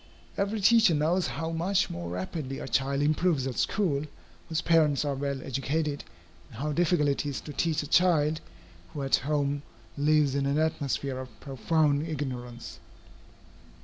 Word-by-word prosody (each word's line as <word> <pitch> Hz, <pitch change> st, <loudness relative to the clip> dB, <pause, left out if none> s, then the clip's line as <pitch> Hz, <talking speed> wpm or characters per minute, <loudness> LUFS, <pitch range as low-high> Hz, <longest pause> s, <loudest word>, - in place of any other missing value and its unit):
Every 200 Hz, +2 st, -1 dB
teacher 220 Hz, -4 st, +5 dB
knows 165 Hz, +5 st, +1 dB
how 165 Hz, 0 st, -3 dB
much 180 Hz, +4 st, +1 dB
more 85 Hz, 0 st, -5 dB
rapidly 130 Hz, -, -4 dB
a -, -, -6 dB
child 140 Hz, +1 st, +1 dB
improves 155 Hz, -2 st, +2 dB
at 130 Hz, -2 st, -3 dB
school, 155 Hz, -8 st, 0 dB, 0.4 s
whose 160 Hz, -1 st, 0 dB
parents 155 Hz, -4 st, +3 dB
are 145 Hz, -, 0 dB
well 140 Hz, -1 st, -3 dB
educated, 145 Hz, +3 st, -2 dB, 0.5 s
and -, -, -12 dB
how 150 Hz, +2 st, -2 dB
difficult 165 Hz, -1 st, +2 dB
it 140 Hz, -, 0 dB
is 140 Hz, -3 st, -3 dB
to 150 Hz, -, -8 dB
teach 155 Hz, -1 st, 0 dB
a -, -, -7 dB
child 160 Hz, -2 st, +3 dB, 0.5 s
who 145 Hz, -, -3 dB
at 135 Hz, -, +3 dB
home 145 Hz, 0 st, -1 dB, 0.4 s
lives 150 Hz, -1 st, +3 dB
in 140 Hz, 0 st, 0 dB
an 140 Hz, +1 st, +1 dB
atmosphere 140 Hz, -4 st, -1 dB
of 125 Hz, -5 st, -10 dB
profound 145 Hz, +4 st, +1 dB
ignorance. 125 Hz, -, -5 dB
145 Hz, 155 wpm, -28 LUFS, 135-160 Hz, 0.5 s, teacher